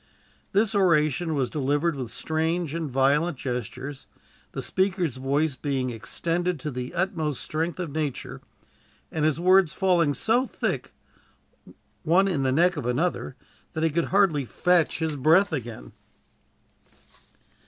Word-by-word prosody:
This 210 +2 +2
oration 165 -4 +2
was 135 -3 +1
delivered 145 +3 0
with 125 -4 -5
strange 160 0 -1
and 165 -3 -3
violent 140 +5 +2
gestures, 125 +2 -5 0.4
the - - -4
speaker's 185 - 0
voice 140 +2 0
being 130 -3 -2
extended 165 +9 -2
to 150 - -3
the 125 +4 -5
uttermost 165 -6 -1
strength 165 +3 -2
of 170 -5 -3
nature, 150 -3 -4 0.7
and 155 -1 0
his 155 0 +1
words 185 -1 +4
falling 175 -6 +2
so 245 +4 +2
thick, - - -3 1.1
one 180 +5 +3
in 170 -8 0
the 130 -1 +1
neck 175 +5 +3
of 135 -5 -3
another, 135 +1 -1 0.4
that 160 - -2
he 165 - +2
could 170 +2 +1
hardly 190 -7 +3
fetch 175 +5 +2
his 160 -2 -2
breath 160 +7 +4
again. 120 - -5
155 Hz, 135 wpm, -26 LUFS, 135-175 Hz, 1.1 s, words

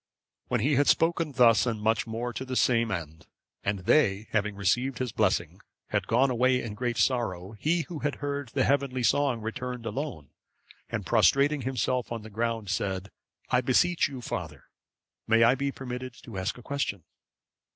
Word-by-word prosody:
When 125 -3 0
he 140 +3 +2
had 145 - +3
spoken 165 -2 +2
thus 120 -2 +5
much 110 -1 0
and 115 - -9
more 120 +2 -3
to 130 - -4
the 130 -1 -5
same 115 -2 +3
end, 80 -5 -5 0.4
and 100 -1 -1
they, 105 -2 +2
having 105 -1 0
received 125 +7 0
his 130 -2 -2
blessing, 95 -4 0 0.3
had 100 -2 -1
gone 130 +4 +3
away 125 +1 +3
in 115 -4 -5
great 120 +2 -2
sorrow, 100 -8 0
he 155 +10 0
who 165 -1 -7
had 145 -1 -1
heard 145 -2 -4
the - - +1
heavenly 135 -2 +1
song 135 -2 +2
returned 125 +2 -5
alone, 115 - -5 0.6
and - - -3
prostrating 140 +1 +3
himself 125 -1 -1
on 115 -2 -4
the 110 - -10
ground, 115 -2 -2
said, 95 0 -2 0.4
"I 125 - +4
beseech 135 +7 +3
you, 130 -3 -8
father, 75 - -6 0.6
may 115 +1 +5
I 115 +2 +6
be 140 +1 -1
permitted 125 -2 -6
to 110 -6 -6
ask 95 +5 -2
a 120 - -12
question?" 140 - -3
120 Hz, 175 wpm, -28 LUFS, 105-130 Hz, 0.6 s, I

